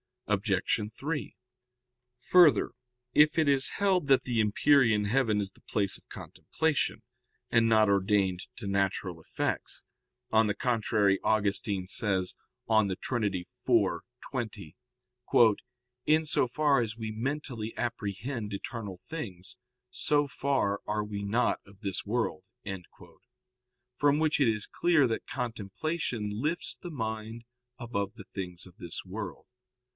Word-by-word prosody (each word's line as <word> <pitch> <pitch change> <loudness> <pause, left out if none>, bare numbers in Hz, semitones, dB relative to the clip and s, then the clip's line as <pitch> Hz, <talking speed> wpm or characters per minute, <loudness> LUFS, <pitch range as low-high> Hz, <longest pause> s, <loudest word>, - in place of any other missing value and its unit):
Obj. 100 0 +1 0.2
3: 150 +1 -3 0.9
Further, 175 -9 +5 0.4
if 150 +2 +5
it 155 -3 +4
is 135 -1 +3
held 190 -6 +1
that 135 -2 +5
the 120 -3 -1
empyrean 110 0 +4
heaven 110 -2 +2
is 100 -1 -4
the - - -22
place 100 -3 0
of - - -26
contemplation, 150 -8 -2 0.5
and 115 -1 +4
not 110 -2 +5
ordained 100 -2 +2
to 115 - -8
natural 95 -3 -1
effects; - - -3 0.5
on 110 0 +4
the 105 - 0
contrary, 105 -4 +2
Augustine 100 -2 +1
says 95 -2 +1 0.3
(De 110 -4 +3
Trin. 120 +2 -2
iv, 95 -3 -1 0.9
20): 110 - -5 1.3
"In 155 +1 +4
so 145 - +2
far 140 +1 +3
as 115 -1 -3
we 110 -2 -4
mentally 120 -1 -3
apprehend 115 0 -3
eternal 100 -1 -5
things, 100 - -7 0.3
so 145 -1 +1
far 130 -8 0
are 105 0 0
we 105 -1 -5
not 110 +5 +1
of 100 +1 -18
this 95 -4 -3
world"; 110 -6 -1 1.5
from 145 0 +4
which 155 0 +2
it 135 - +4
is 110 -2 +1
clear 170 -5 +3
that 115 - -3
contemplation 120 - -3
lifts 150 +11 -2
the 175 - -9
mind 110 -4 -4 0.3
above 100 -4 -3
the 100 - -11
things 90 -2 -6
of 90 -2 -16
this 85 -2 -6
world. 105 +3 -6
110 Hz, 130 wpm, -29 LUFS, 100-135 Hz, 1.5 s, Further